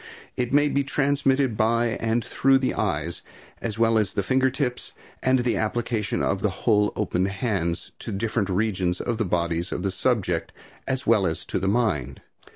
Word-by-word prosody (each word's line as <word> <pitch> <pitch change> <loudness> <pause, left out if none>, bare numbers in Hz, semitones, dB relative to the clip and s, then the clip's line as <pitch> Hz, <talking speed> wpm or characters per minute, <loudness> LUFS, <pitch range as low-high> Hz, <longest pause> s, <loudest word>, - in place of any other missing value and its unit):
It 125 -1 -2
may 145 +1 +4
be 140 -1 +1
transmitted 135 -2 +1
by 115 +2 +2
and 115 +1 0
through 135 0 +3
the 130 -1 0
eyes, 85 -5 -2 0.4
as 115 -2 -3
well 115 -1 +3
as 105 -3 -1
the 100 - 0
finger 130 +5 +2
tips, 130 -2 -3 0.3
and 130 0 +3
the 120 -1 0
application 110 -1 -1
of 95 - 0
the 105 - +2 0.2
whole 105 -3 +4
open 95 -3 0
hands, 95 -5 -2
to - - -5
different 105 0 -1
regions 95 -3 0
of 120 -2 -2
the 110 - +1
body 85 -2 0
of - - -3
the 100 - 0
subject, 95 -4 0 0.3
as 130 0 -2
well 105 -4 +4
as 80 - -3
to - - -2
the 95 - -1
mind. 100 - 0
110 Hz, 180 wpm, -25 LUFS, 95-125 Hz, 0.4 s, may